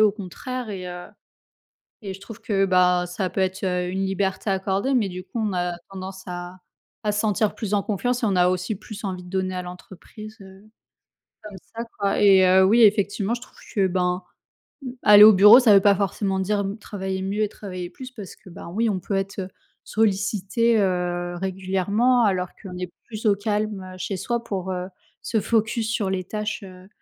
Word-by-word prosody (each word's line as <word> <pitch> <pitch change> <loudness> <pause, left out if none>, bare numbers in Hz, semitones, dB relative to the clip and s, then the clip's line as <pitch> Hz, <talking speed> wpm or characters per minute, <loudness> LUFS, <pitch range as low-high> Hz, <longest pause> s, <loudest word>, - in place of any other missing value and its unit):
au 215 -2 +5
contraire 225 +4 -6
et 185 -2 -6
heu, 180 0 -7 0.9
et 195 -4 -6
je 195 - -12
trouve 215 +2 -11
que, 205 -3 +1
bah, 180 -1 +3
ça 185 +2 -3
peut 190 +2 -1
être, 190 +1 -2
heu, 180 -1 -1
une 190 +1 -1
liberté 195 +1 -2
accordée. 195 +7 0
Mais 210 -6 +1
du 180 +1 -7
coup 235 - -7
on 205 - -2
a 175 -1 -2
tendance 190 0 -8
à 175 0 -7 0.4
à 210 -1 0
se 210 - 0
sentir 215 -1 +1
plus 210 -2 -3
en 200 - +2
confiance 245 +4 -1
et - - +2
on 200 - +1
a 180 0 +4
aussi 185 +4 -1
plus 215 +2 -10
envie 185 -2 -4
de 180 - -13
donner 185 0 -2
à 180 - -3
l'entreprise, 190 +4 -11
heu, 190 0 -14 0.8
comme 205 -2 -9 0.2
ça 230 - -3 0.2
quoi 200 -1 +1
et 195 -2 +6
heu, 190 +1 +6
oui 230 +5 +4
effectivement 205 +1 +3
je 240 - -9
trouve - - -15 0.2
que, 195 -3 +3
ben, 180 0 -1 0.6
mmh, 255 - -5
aller 210 0 +9
au 215 - +10
bureau 210 +5 +9
ça 240 -5 +5
veut 195 - +7
pas 200 0 +5
forcément 195 0 -1
dire 200 +2 0
m 200 +1 -3
travailler 190 -2 -5
mieux 200 +3 -1
et 210 - +1
travailler 185 -4 -7
plus 255 +7 -10
parce 205 -7 -10
que, 185 - -16
ben, 170 - -10
oui, 220 +6 0
on 190 -3 -2
peut 195 - -4
être, 195 +1 -3
heu, 185 - -5 0.4
sollicité, 215 +2 +1
heu, 180 -2 -1
régulièrement 195 +6 +1
alors 185 -3 +1
qu'on 185 -3 -8
est 180 -1 -5
plus 220 0 -8
au 205 - +5
calme, 210 -1 -2
heu, - - -12
chez 190 0 -4
soi 235 +3 -2
pour, 190 -3 -4
heu, 180 0 -3 0.3
se 225 - 0
focus 220 +1 0
sur 200 -4 -1
les 185 -1 -2
tâches, 210 +2 -4
heu, 185 -1 -12
195 Hz, 210 wpm, -23 LUFS, 185-215 Hz, 0.9 s, au